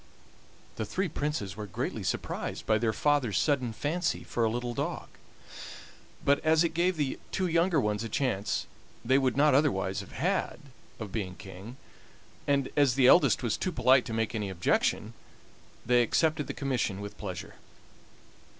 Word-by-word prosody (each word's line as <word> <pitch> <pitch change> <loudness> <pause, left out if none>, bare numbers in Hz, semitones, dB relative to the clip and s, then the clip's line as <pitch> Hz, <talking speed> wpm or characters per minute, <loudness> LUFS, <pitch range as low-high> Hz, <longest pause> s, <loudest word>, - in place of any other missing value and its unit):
The - - -1
three 190 - -1
Princes 145 - -3
were 105 0 -6
greatly 110 +3 -4
surprised 90 - -3
by 110 0 +2
their 115 0 +1
father's 130 -6 +1
sudden 130 -6 +1
fancy 160 +10 -2
for 120 - -2
a 110 - +3
little 120 +1 -3
dog, - - -4 1.2
but 140 0 +4
as 160 +1 +4
it 165 -1 -1
gave 175 +1 +1
the 145 -3 -1
two 185 - 0
younger 170 -1 +2
ones 105 -2 -1
a 115 - -5
chance 105 -5 -1 0.4
they 130 +3 +4
would 130 -1 0
not 150 0 +5
otherwise 100 -9 +1
have 100 - -9
had 185 +4 -1 0.4
of 110 -4 -6
being 95 -5 -4
king, 95 +7 -10 0.7
and 140 -2 +1
as 140 -4 +3
the 135 -2 +4
eldest 135 +1 +5
was 115 - 0
too 185 - -2
polite 130 -3 +4
to - - -6
make 115 +1 -1
any 105 -3 -2
objection, 90 -2 0 0.7
they 125 0 +4
accepted 155 +5 +1
the - - -5
commission 125 -8 -1
with 100 0 -7
pleasure. 100 0 -7
125 Hz, 165 wpm, -29 LUFS, 105-145 Hz, 1.2 s, not